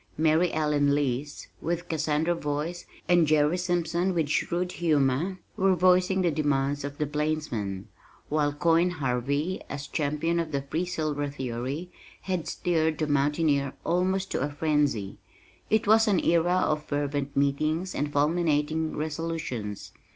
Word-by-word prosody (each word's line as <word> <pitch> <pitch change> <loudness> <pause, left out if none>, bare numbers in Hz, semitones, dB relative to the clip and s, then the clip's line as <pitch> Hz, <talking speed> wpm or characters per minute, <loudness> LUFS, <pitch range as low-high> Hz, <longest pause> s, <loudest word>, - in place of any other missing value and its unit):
Mary 160 +3 +3
Ellen 150 -2 +2
Lease 145 0 -2
with 175 +1 -2
Cassandra 160 +1 0
voice, 155 +2 -3 0.2
and 175 -3 +4
Jerry 150 +2 +3
Simpson 175 +1 0
with 160 -4 0
shrewd 180 +4 0
humor 155 +2 +1 0.2
were 190 -3 +3
voicing 185 +1 +3
the 175 - +2
demands 145 -1 0
of 145 0 -5
the 150 - 0
plainsman, 145 -10 -2 0.4
while 150 -1 +1
"Coin" 165 +4 +3
Harvey 140 +2 -1
as 145 0 -5
champion 150 +4 -1
of 165 -2 -2
the 140 -2 -1
Free 160 +6 -2
Silver 150 -4 -2
theory 135 +5 -4 0.3
had 185 -4 -3
stirred 160 -3 0
the 155 - 0
Mountaineer 145 -1 +1
almost 185 +3 0
to - - -1
a 145 - 0
frenzy. 145 -9 0 0.5
It 220 0 +2
was 220 +2 +5
an 195 -4 +3
era 170 +1 +3
of 150 0 0
fervent 145 -1 -2
meetings 155 +6 0
and 145 0 -2
fulminating 155 +1 +1
resolutions. 150 -9 -4
155 Hz, 140 wpm, -27 LUFS, 145-170 Hz, 0.5 s, was